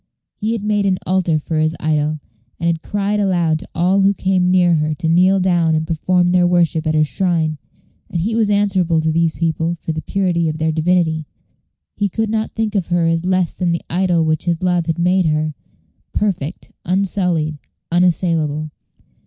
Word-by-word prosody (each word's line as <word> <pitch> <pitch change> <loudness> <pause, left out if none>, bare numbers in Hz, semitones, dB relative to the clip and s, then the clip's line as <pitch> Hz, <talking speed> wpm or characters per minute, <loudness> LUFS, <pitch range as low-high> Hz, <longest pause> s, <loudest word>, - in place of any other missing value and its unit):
He 220 +1 -1
had 225 -3 -4
made 205 -1 +1
an 185 -1 +1
altar 180 -4 +1
for 155 +1 -2
his 155 +1 +1
idol, 155 0 0 0.4
and 170 - -3
had 165 -1 0
cried 205 +2 -1
aloud 175 -5 +1
to - - -9
all 185 +3 +2
who 200 +1 +3
came 185 -2 +1
near 180 -1 +4
her 155 -1 0
to 165 +1 -3
kneel 185 +4 +4
down 175 -3 +2
and 155 0 -1
perform 175 +3 +1
their 180 0 +3
worship 170 -2 +1
at 155 - +1
her 155 - +4
shrine, 160 -2 0 0.5
and 170 - -2
he 210 +7 -1
was 220 -2 +1
answerable 190 -5 +2
to 160 0 0
these 165 0 +1
people 165 0 -1
for 165 - -5
the 155 0 -4
purity 175 -3 0
of 155 - -4
their 160 0 0
divinity. 160 -1 0 0.7
He 205 -1 0
could 220 +3 -2
not 220 0 -2
think 225 -1 -1
of 195 -5 -1
her 175 -1 +1
as 165 +1 0
less 185 -2 +1
than 175 -2 -1
the 170 - -2
idol 175 -2 +1
which 155 +1 0
his 170 0 -1
love 175 -2 +1
had 165 0 -1
made 180 +1 +2
her 155 0 0 0.6
perfect, 185 -6 -2
unsullied, 180 -5 0 0.3
unassailable. 165 -3 +1
175 Hz, 190 wpm, -18 LUFS, 160-185 Hz, 0.7 s, near